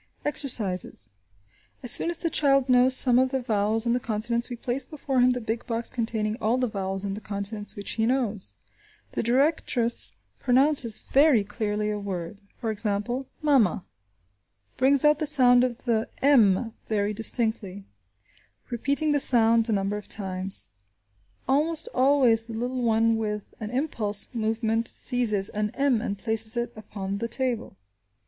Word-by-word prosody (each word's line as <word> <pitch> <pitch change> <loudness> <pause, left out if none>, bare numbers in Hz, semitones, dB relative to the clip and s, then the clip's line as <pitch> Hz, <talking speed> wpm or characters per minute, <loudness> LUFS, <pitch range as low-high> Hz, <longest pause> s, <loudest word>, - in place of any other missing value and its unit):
Exercises. 200 - +1 0.7
As 245 - +6
soon - - +4
as 340 - +1
the 335 -1 -3
child 275 -3 +2
knows 255 +1 +5
some 250 -2 +8
of 260 0 +2
the 265 -1 -3
vowels 220 0 0
and 235 - +1
the - - 0
consonants 235 +1 -1
we 245 - -5
place 245 +3 -2
before 275 -4 -4
him 250 0 +4
the 250 0 -1
big 225 0 -5
box 230 0 -3
containing 225 -2 -2
all 225 +4 +1
the 255 - 0
vowels 195 -3 -3
and 195 -1 -4
the 215 - -9
consonants 205 0 -6
which 205 - -4
he 225 0 -1
knows. 235 -6 -2 0.6
The - - -3
directress 245 -2 +1 0.3
pronounces 255 -3 +2
very 275 -6 +3
clearly 210 0 -3
a 210 - -4
word; 190 -1 -7 0.2
for 225 -2 -3
example, 215 +5 -3 0.2
"mama," 240 - +2 0.9
brings 270 +2 +2
out 300 0 +4
the 310 - +3
sound 250 -4 +5
of 250 -1 -3
the 225 -3 -1
m 230 -5 +3 0.2
very 210 -1 -1
distinctly, 220 -3 +1 0.9
repeating 280 +6 -1
the 290 - +1
sounds 230 -3 +5
a - - +1
number 200 0 -1
of 210 - -10
times. 190 -1 -3 0.8
Almost 310 +4 +1
always 255 -4 +2
the 230 - -9
little 250 +2 -3
one 225 -1 +1
with 210 -2 -5
an 215 - -6
impulsive 235 -5 -1
movement 225 0 -1
seizes 220 -6 0
an 210 0 -3
m 275 -5 +1
and 200 -3 -4
places 220 +2 +1
it 240 0 -3
upon 200 -2 -6
the 230 - -3
table. 240 - -2
230 Hz, 160 wpm, -25 LUFS, 210-255 Hz, 0.9 s, some